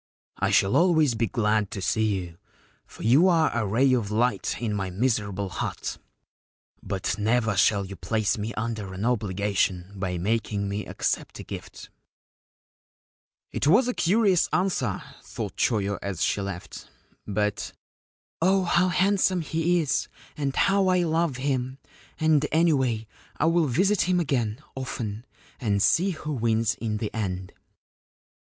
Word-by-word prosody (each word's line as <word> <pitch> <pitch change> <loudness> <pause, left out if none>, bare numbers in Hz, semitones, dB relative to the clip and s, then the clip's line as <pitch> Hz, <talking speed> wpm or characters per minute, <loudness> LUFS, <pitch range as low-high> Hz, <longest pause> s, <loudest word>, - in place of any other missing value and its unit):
' - - -43
I - - +1
shall 95 - +3
always 160 -7 +4
be 115 0 0
glad 105 -1 +1
to - - -6
see 110 +2 +1
you, 85 -1 -11 0.5
for - - -11
you 135 - +5
are 165 -6 +3
a 115 -3 0
ray 130 +6 +3
of 115 -5 0
light 120 +4 0
in 115 -3 -2
my 95 -2 -2
miserable 100 -2 -1
hut; - - -4 0.8
but 95 +1 -3
never 115 0 +1
shall 100 0 +3
you 100 +1 -8
place 110 +3 0
me 110 +1 -4
under 110 -4 -4
an 100 +4 -3
obligation 100 -4 0
by 95 -2 -3
making 105 +1 -1
me 100 +2 -4
accept - - -2
a - - -7
gift/ - - -9 1.6
It - - -1
was 220 - +5
a 250 - 0
curious 195 -2 +3
answer, 155 - 0 0.2
thought - - -6
Choyo 100 -3 0
as 100 -4 -3
she 100 - +1
left; 100 -3 -7 0.4
but 105 0 -1 0.4
* - - -71
Oh, 190 +2 +3
how 175 +1 +3
handsome 185 0 +2
he 165 +2 +1
is, 150 - 0 0.3
and 140 -2 -2
how 195 0 +3
I 180 -1 +3
love 160 -4 0
him! 130 -1 -2 0.4
and 155 -2 +3
anyway 135 -9 +2 0.3
I - - +1
will 165 -1 +3
visit 185 - +2
him 180 -1 +3
again, 125 -6 -1
often, 115 -4 -5 0.3
and 105 -5 0
see 175 - +3
who 155 -4 -4
wins 115 -3 +1
in 110 -1 -3
the 105 0 -4
end.' 95 -4 -4
115 Hz, 150 wpm, -26 LUFS, 100-160 Hz, 1.6 s, you